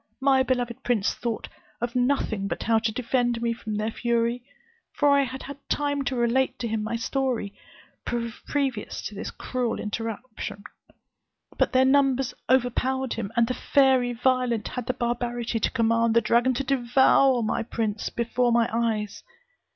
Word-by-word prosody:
My 270 Hz, -1 st, +4 dB
beloved 245 Hz, -3 st, -1 dB
prince 230 Hz, -5 st, +1 dB
thought 235 Hz, -2 st, -4 dB, 0.3 s
of 240 Hz, +1 st, -3 dB
nothing 245 Hz, -6 st, +1 dB
but -, -, -3 dB
how 225 Hz, 0 st, +3 dB
to 220 Hz, 0 st, -1 dB
defend 240 Hz, 0 st, 0 dB
me 235 Hz, 0 st, 0 dB
from 220 Hz, -2 st, -5 dB
their 215 Hz, +2 st, -1 dB
fury; 235 Hz, +1 st, 0 dB, 0.5 s
for 290 Hz, -1 st, +3 dB
I 280 Hz, 0 st, +5 dB
had 265 Hz, 0 st, -4 dB
had 280 Hz, 0 st, -8 dB
time 285 Hz, -1 st, 0 dB
to 260 Hz, -, -1 dB
relate 255 Hz, +2 st, +1 dB
to 235 Hz, -, -3 dB
him 220 Hz, -1 st, -1 dB
my 220 Hz, +2 st, -2 dB
story, 245 Hz, -3 st, -1 dB, 0.5 s
previous 240 Hz, +1 st, -3 dB
to -, -, -5 dB
this 200 Hz, -, -5 dB
cruel 250 Hz, -2 st, -3 dB
interruption; 220 Hz, -1 st, -5 dB, 0.9 s
but -, -, +1 dB
their 260 Hz, 0 st, +5 dB
numbers 270 Hz, -1 st, +3 dB, 0.2 s
overpowered 260 Hz, 0 st, +1 dB
him, 220 Hz, -3 st, -4 dB
and 235 Hz, -, +4 dB
the 255 Hz, -, -2 dB
fairy 260 Hz, -2 st, +3 dB
Violent 245 Hz, -2 st, 0 dB
had 250 Hz, -2 st, -5 dB
the 255 Hz, -, +1 dB
barbarity 240 Hz, -1 st, -2 dB
to -, -, +1 dB
command 230 Hz, -1 st, +2 dB
the -, -, +7 dB
dragon 240 Hz, +3 st, +2 dB
to 275 Hz, -, -1 dB
devour 265 Hz, -1 st, +3 dB
my 215 Hz, -, 0 dB
prince 220 Hz, -2 st, -2 dB
before 240 Hz, +1 st, 0 dB
my 235 Hz, 0 st, +3 dB
eyes. 220 Hz, -3 st, -1 dB
240 Hz, 160 wpm, -25 LUFS, 230-260 Hz, 0.9 s, the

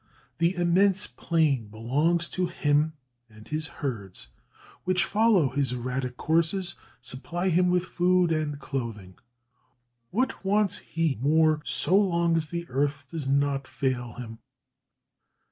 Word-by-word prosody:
The 170 Hz, +2 st, +2 dB
immense 180 Hz, +3 st, +3 dB
plain 150 Hz, -9 st, 0 dB
belongs 145 Hz, +11 st, 0 dB
to 185 Hz, -1 st, -1 dB
him, 150 Hz, -2 st, +1 dB, 0.4 s
and 110 Hz, -1 st, -15 dB
his 155 Hz, +1 st, -2 dB
herds, 105 Hz, -, -6 dB, 0.5 s
which 185 Hz, 0 st, +2 dB
follow 210 Hz, -9 st, +3 dB
his 135 Hz, 0 st, 0 dB
erratic 125 Hz, 0 st, -3 dB
courses, 170 Hz, +3 st, +1 dB, 0.3 s
supply 170 Hz, +9 st, -2 dB
him 180 Hz, +1 st, +3 dB
with 180 Hz, 0 st, +2 dB
food 180 Hz, -1 st, +2 dB
and 155 Hz, -2 st, -1 dB
clothing. 115 Hz, -10 st, -5 dB, 0.9 s
What 250 Hz, -, -1 dB
wants 205 Hz, 0 st, +2 dB
he 160 Hz, -7 st, -1 dB
more, 155 Hz, +2 st, +3 dB
so 125 Hz, +8 st, +1 dB
long 170 Hz, -4 st, +3 dB
as 160 Hz, -1 st, 0 dB
the 170 Hz, +2 st, -4 dB
earth 140 Hz, +1 st, -1 dB
does 155 Hz, -5 st, -4 dB
not 140 Hz, -1 st, +1 dB
fail 125 Hz, -4 st, -2 dB
him?" 115 Hz, -2 st, -8 dB
155 Hz, 130 wpm, -27 LUFS, 130-175 Hz, 0.9 s, immense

